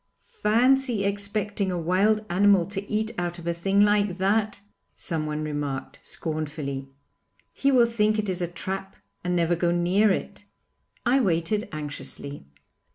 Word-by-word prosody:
'Fancy 250 - +2
expecting 200 0 -1
a 180 - -2
wild 195 +6 +2
animal 195 -1 +4
to 200 +1 -6
eat 215 +1 0
out 175 0 -2
of 170 - -10
a 170 - 0
thing 195 +4 +2
like 205 -2 +3
that,' 205 +2 +1 0.4
someone 155 -2 -3
remarked, 145 -3 -4
scornfully; 150 -4 -4 0.7
'he 275 - +2
will 250 -3 +6
think 215 -2 +1
it 210 -1 -1
is 185 -1 -2
a 175 - 0
trap 190 +3 -5 0.3
and 180 0 0
never 170 0 +2
go 170 +1 +1
near 175 +5 +3
it.' 190 - -2 0.6
I 250 +3 +4
waited 195 0 0
anxiously. 145 - -5
190 Hz, 145 wpm, -26 LUFS, 170-210 Hz, 0.7 s, will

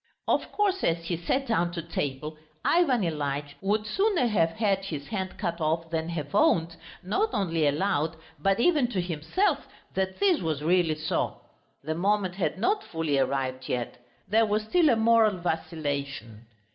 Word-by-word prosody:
Of - - +1
course 395 -2 0
as 165 0 +1
he 170 - -1
sat 260 +11 -1
down 175 -8 +1
to 170 - -3
table, 150 -2 -3 0.3
Ivan 280 - +3
Ilyitch 145 -3 -2
would 210 +2 0
sooner 390 - +2
have 200 -8 +2
had 200 -3 0
his 150 -7 -5
hand 190 -3 -4
cut 170 0 -3
off 165 +1 0
than 160 0 -1
have 150 -4 -4
owned, 170 - +3 0.3
not 230 - +1
only 165 -7 +1
aloud, 155 +1 0 0.2
but 195 +6 +2
even 295 -1 +3
to 190 - 0
himself, 185 - 0 0.3
that 190 0 -2
this 390 -4 +3
was 155 -4 -2
really 170 -1 +3
so. 155 - -2 0.4
The 155 +2 -2
moment 190 +2 +1
had 190 0 -1
not 405 - +1
fully 160 -4 -1
arrived 130 -1 -1
yet. 120 0 -3 0.2
There 220 +2 +3
was 210 +1 0
still 320 +8 +3
a 240 - +5
moral 225 -2 +4
vacillation. 140 -9 -4
175 Hz, 165 wpm, -27 LUFS, 155-220 Hz, 0.4 s, a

